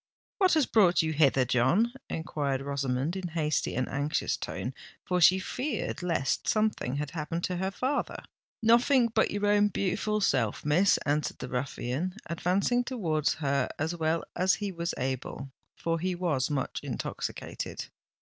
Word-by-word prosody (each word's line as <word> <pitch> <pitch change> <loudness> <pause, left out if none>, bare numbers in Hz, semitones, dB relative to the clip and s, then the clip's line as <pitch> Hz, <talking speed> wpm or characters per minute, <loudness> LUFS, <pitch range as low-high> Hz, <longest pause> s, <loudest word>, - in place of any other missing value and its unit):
"What 375 -4 +4
has 310 -4 +4
brought 185 -8 +4
you 160 0 -1
hither, 135 -4 +4
John?" 130 - +2 0.2
enquired 145 -4 -2
Rosamond, 140 +2 -1
in 190 -2 -3
hasty 155 -2 -1
and 130 +1 0
anxious 145 +3 -1
tone—for 180 -1 -4
she 185 +3 +7
feared 250 +2 -3
lest 165 -7 0
something 215 - +1
had 145 0 -3
happened 165 +1 -3
to 180 - -1
her 190 +2 -1
father. 260 +8 -2 0.4
"Nothink 235 +1 +4
but - - +3
your 205 0 -1
own 205 0 +4
beautiful 205 +2 -1
self, 130 - +1
Miss," 175 +7 +4
answered 145 -2 0
the 125 - -6
ruffian, 130 +6 -2
advancing 190 +9 +1
towards 170 - 0
her 140 0 +1
as 160 +3 -1
well 165 0 0
as 185 +1 +3
he 205 -2 -3
was 170 -1 -3
able—for 135 +5 -4
he 185 +2 -1
was 165 -8 0
much 140 -3 -2
intoxicated. - - -5
170 Hz, 145 wpm, -29 LUFS, 140-200 Hz, 0.4 s, she